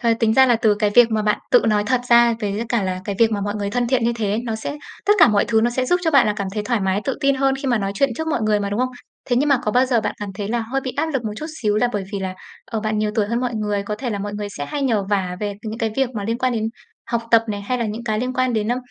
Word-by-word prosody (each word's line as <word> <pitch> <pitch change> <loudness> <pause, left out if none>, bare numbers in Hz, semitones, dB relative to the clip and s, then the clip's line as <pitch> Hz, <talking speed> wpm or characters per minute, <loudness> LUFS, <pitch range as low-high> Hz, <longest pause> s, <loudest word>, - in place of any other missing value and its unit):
ờ, 235 -2 +3
tính 220 -1 +3
ra 265 0 +6
là 240 -2 +4
từ 220 -2 +3
cái 210 0 0
việc 240 -1 +7
mà 215 -1 0
bạn 210 0 +1
tự 245 - +6
nói 210 -1 +2
thật 255 -2 +2
ra 235 -1 +6
với 205 +1 -2
cả 230 -4 +1
là 185 -1 -2
cái 200 - -3
việc 230 -1 +4
mà 205 - -1
mọi 205 +1 -2
người 200 -1 -3
thân 245 +1 0
thiện 245 -2 +1
như 235 - +2
thế, 210 -2 -1
nó 225 -2 -2
sẽ 255 +6 -5 0.3
tất 415 - +6
cả 320 - +8
mọi 205 -2 +3
thứ 225 -1 +2
nó 240 +2 +2
sẽ 255 +1 -1
giúp 355 +4 +2
cho 320 - +2
bạn 275 -6 +5
là 210 - +2
cảm 200 -2 -3
thấy 210 - -1
thoải 235 -1 0
mái, 190 +1 0
tự 270 - 0
tự - - -7
tin 275 -1 +3
hơn 270 0 +1
khi 275 - -5
mà 240 -3 +2
nói 195 -1 -2
chuyện 275 +4 +2
trước 320 - -3
mọi 305 - 0
người 215 -1 +2
mà, 200 0 -2
đúng 205 - -1
không? 255 - +1 0.4
Thế 245 - 0
nhưng 290 +3 +2
mà 275 -3 +4
có 210 - 0
bao 250 +3 +3
giờ 240 -3 +2
bạn - - -3
cảm 205 - -4
thấy 205 +1 -4
là 235 +1 0
hơi 270 +3 -1
bị 260 -1 -5
áp 320 - +1
lực 255 -4 -2
một 210 - -2
chút 310 - -5 0.2
xíu 210 -1 +2
là 245 +3 +2
bởi 205 -2 -2
vì 200 - -2
là, 190 -1 -4 0.3
ờ, 225 - -4
bạn 215 0 -1
nhiều 210 0 0
tuổi 215 -2 +1
hơn 235 +3 -1
mọi 250 -2 -2
người, 210 -2 -1
có 210 +1 -4
thể 245 +2 -4
là 205 - -2
mọi 205 +1 -4
người 205 0 -4
sẽ 145 - -3
hay 285 - -3
nhờ 225 -6 +1
vả 185 -3 0
về 205 -1 -2
c 205 - -21
những 220 +1 -5
cái 225 -1 0
việc 265 -2 +1
mà 205 -2 -3
liên 230 +2 -2
quan 255 0 +1
đến 220 -1 -1 0.4
học 235 -1 -1
tập 230 -1 +6
này, 205 -1 -3
hay 250 +5 -2
là 235 - -1
những 220 +3 -5
cái 215 -2 -1
liên 255 +2 -2
quan 255 -1 0
đến, 215 -1 -1
ơ, 245 - +1
225 Hz, 355 wpm, -21 LUFS, 210-250 Hz, 0.4 s, cả